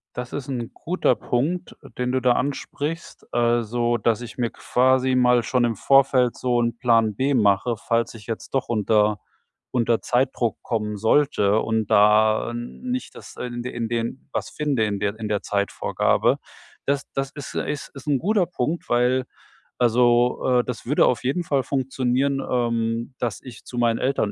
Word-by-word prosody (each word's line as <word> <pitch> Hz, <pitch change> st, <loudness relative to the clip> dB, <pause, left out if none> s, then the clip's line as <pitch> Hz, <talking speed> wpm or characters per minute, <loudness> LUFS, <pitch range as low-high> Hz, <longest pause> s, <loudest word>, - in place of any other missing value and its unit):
Das 125 Hz, 0 st, -5 dB
ist 140 Hz, -1 st, -5 dB
'n 120 Hz, -4 st, -4 dB
guter 180 Hz, -5 st, +1 dB
Punkt, 140 Hz, +11 st, -2 dB, 0.2 s
den 125 Hz, 0 st, -1 dB
du 130 Hz, -, +1 dB
da 125 Hz, 0 st, +4 dB
ansprichst. 145 Hz, +4 st, -4 dB
Also, 120 Hz, 0 st, +1 dB
dass 115 Hz, 0 st, 0 dB
ich 120 Hz, +1 st, -9 dB
mir 120 Hz, -2 st, 0 dB
quasi 130 Hz, +1 st, +2 dB
mal 125 Hz, -2 st, +4 dB
schon 125 Hz, -2 st, +1 dB
im 115 Hz, -1 st, -1 dB
Vorfeld 130 Hz, 0 st, +3 dB
so 120 Hz, -1 st, +1 dB
'n 120 Hz, 0 st, -1 dB
Plan 115 Hz, -4 st, +2 dB
B 140 Hz, +2 st, +1 dB
mache, 110 Hz, +1 st, +2 dB
falls 115 Hz, +2 st, -1 dB
ich 110 Hz, -3 st, -12 dB
jetzt 115 Hz, 0 st, -6 dB
doch 135 Hz, -, -1 dB
unter 105 Hz, -2 st, +2 dB, 0.5 s
unter 120 Hz, -2 st, +1 dB
Zeitdruck 125 Hz, -2 st, 0 dB
kommen 105 Hz, -2 st, -2 dB
sollte 110 Hz, -2 st, +2 dB
und 110 Hz, -2 st, -1 dB
da 110 Hz, +2 st, +4 dB
äh, -, -, -7 dB
nicht 250 Hz, -, -5 dB
das -, -, -12 dB
in 120 Hz, -1 st, -5 dB
de 125 Hz, -, -6 dB
in 115 Hz, -1 st, -3 dB
den 120 Hz, +4 st, -3 dB
was -, -, -3 dB
finde 140 Hz, -7 st, 0 dB
in 100 Hz, -1 st, -2 dB
der 105 Hz, +1 st, -2 dB
in 110 Hz, -, -3 dB
der 105 Hz, -1 st, -1 dB
Zeitvorgabe. 100 Hz, -1 st, +1 dB, 0.5 s
Das 140 Hz, 0 st, 0 dB
das 135 Hz, +1 st, -2 dB
ist 145 Hz, -3 st, -8 dB
ist 150 Hz, -1 st, -3 dB
ist 135 Hz, +2 st, -12 dB
'n 140 Hz, -2 st, +3 dB
guter 195 Hz, -, +1 dB
Punkt, 170 Hz, 0 st, -3 dB
weil 125 Hz, +2 st, +2 dB, 0.5 s
also, 125 Hz, +1 st, +3 dB
äh, -, -, -12 dB
das 125 Hz, -2 st, -6 dB
würde 145 Hz, +5 st, +3 dB
auf 125 Hz, -, 0 dB
jeden 145 Hz, +7 st, 0 dB
Fall 140 Hz, -4 st, +1 dB
funktionieren, 135 Hz, 0 st, 0 dB
ähm, 115 Hz, 0 st, -1 dB
dass 115 Hz, -6 st, -3 dB
ich 125 Hz, -4 st, -12 dB
zu 125 Hz, -, -8 dB
meinen 115 Hz, -1 st, +2 dB
Eltern 130 Hz, -6 st, 0 dB
120 Hz, 175 wpm, -23 LUFS, 115-130 Hz, 0.5 s, da